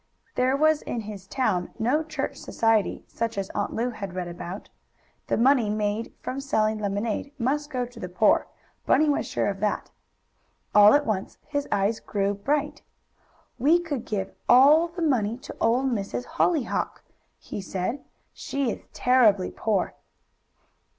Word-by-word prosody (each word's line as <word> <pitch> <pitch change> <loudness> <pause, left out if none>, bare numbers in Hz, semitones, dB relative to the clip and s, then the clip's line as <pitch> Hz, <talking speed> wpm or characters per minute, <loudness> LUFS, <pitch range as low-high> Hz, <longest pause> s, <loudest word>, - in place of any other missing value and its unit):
There 260 +2 +2
was 310 0 +3
in 235 - -4
his 205 -3 -9
town 195 -9 -1
no 250 +7 +1
church 315 0 -4
society, 225 -2 0
such 230 -2 -3
as 195 -1 -3
Aunt 205 - -2
Lu 240 +2 0
had 200 -5 -7
read 180 -1 -3
about. 175 +3 -7 0.6
The - - +1
money 245 -2 +4
made 210 +1 -1
from 265 - -3
selling 220 -6 0
lemonade 210 +6 -2
must 290 +4 -1
go 250 -4 -2
to 245 - -13
the 180 - -5
poor, 180 +4 +3 0.4
Bunny 310 - +4
was 285 - 0
sure - - -1
of 195 -1 -2
that. 210 +1 -1 0.8
All 210 +2 +8
at 290 0 +2
once 200 -3 -2
his 285 -1 -2
eyes 200 +3 +1
grew 200 -1 -1
bright. 285 +9 -1 0.8
"We 305 +8 +5
could 290 -8 -4
give 195 -3 -3 0.2
all 295 +7 +7
the 340 0 -5
money 235 -7 +1
to 265 - -10
Old 255 +4 +2
Miss 200 -4 -3
Hollyhock!" 320 -4 0 0.3
he - - -7
said. 195 +8 -3 0.3
"She 275 -4 -2
is - - -6
terribly 225 -7 +3
poor." 210 -4 -1
230 Hz, 155 wpm, -26 LUFS, 205-275 Hz, 0.8 s, All